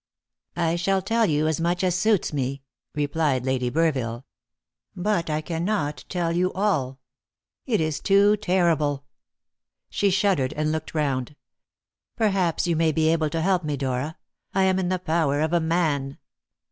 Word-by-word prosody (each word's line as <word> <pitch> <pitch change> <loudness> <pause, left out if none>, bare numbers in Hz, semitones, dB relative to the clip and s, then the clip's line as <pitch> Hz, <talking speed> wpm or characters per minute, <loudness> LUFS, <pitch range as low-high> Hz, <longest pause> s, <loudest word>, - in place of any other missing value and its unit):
"I 165 0 0
shall 190 +2 0
tell 225 +2 +2
you 150 0 +1
as 160 +1 -1
much 175 +2 0
as 180 -1 +2
suits 200 -1 +1
me," 135 -1 -2 0.3
replied 145 -3 0
Lady 130 -2 0
Burville, 130 -5 0 0.7
"but 180 -3 -1
I 155 0 0
cannot 165 -2 -2
tell 175 -2 -1
you 180 +2 +1
all. 150 -10 0 0.7
It 225 -5 +1
is 155 -2 -1
too 200 +1 +4
terrible!" 170 -8 +1 0.9
She 200 - +1
shuddered, 190 -8 +1
and 155 0 -1
looked 160 +1 -4
round. 140 -2 -1 0.8
"Perhaps 195 -7 +1
you 170 -1 +1
may 160 0 +2
be 155 0 +2
able 160 -1 +1
to 165 +2 -2
help 185 0 +1
me, 150 -2 -2
Dora; 135 +3 -3 0.4
I 190 - +3
am 190 0 +2
in 180 -1 -1
the 185 - +1
power 160 -5 0
of 160 +2 0
a 175 - +4
man." 160 -5 0
160 Hz, 160 wpm, -24 LUFS, 145-185 Hz, 0.9 s, too